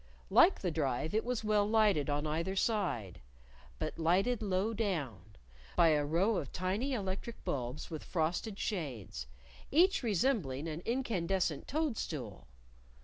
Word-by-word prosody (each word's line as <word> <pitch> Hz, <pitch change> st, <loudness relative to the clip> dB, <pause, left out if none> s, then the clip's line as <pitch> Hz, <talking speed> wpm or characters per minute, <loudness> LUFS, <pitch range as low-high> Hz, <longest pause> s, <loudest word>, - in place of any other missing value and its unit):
Like 355 Hz, +3 st, +6 dB
the 180 Hz, -, 0 dB
Drive 150 Hz, -1 st, -1 dB
it 220 Hz, -, +2 dB
was 245 Hz, -2 st, -2 dB
well 210 Hz, -1 st, +2 dB
lighted 210 Hz, -10 st, +3 dB
on 145 Hz, +1 st, 0 dB
either 165 Hz, +5 st, -1 dB
side 190 Hz, -, -1 dB, 0.6 s
(but 155 Hz, +1 st, -4 dB
lighted 195 Hz, +9 st, +2 dB
low 200 Hz, +2 st, 0 dB
down) 140 Hz, -, -3 dB, 0.4 s
by 165 Hz, -, +6 dB
a 150 Hz, -2 st, +3 dB
row 180 Hz, +9 st, +2 dB
of 140 Hz, -, -4 dB
tiny 200 Hz, +10 st, -1 dB
electric 200 Hz, +1 st, -4 dB
bulbs 125 Hz, +4 st, -3 dB
with 155 Hz, -, -5 dB
frosted 180 Hz, +5 st, -1 dB
shades, 125 Hz, -, -4 dB, 0.4 s
each 360 Hz, +7 st, +4 dB
resembling 190 Hz, -, 0 dB
an 160 Hz, +1 st, -4 dB
incandescent 190 Hz, -, 0 dB
toadstool. 175 Hz, -, -3 dB
185 Hz, 135 wpm, -33 LUFS, 150-220 Hz, 0.6 s, Like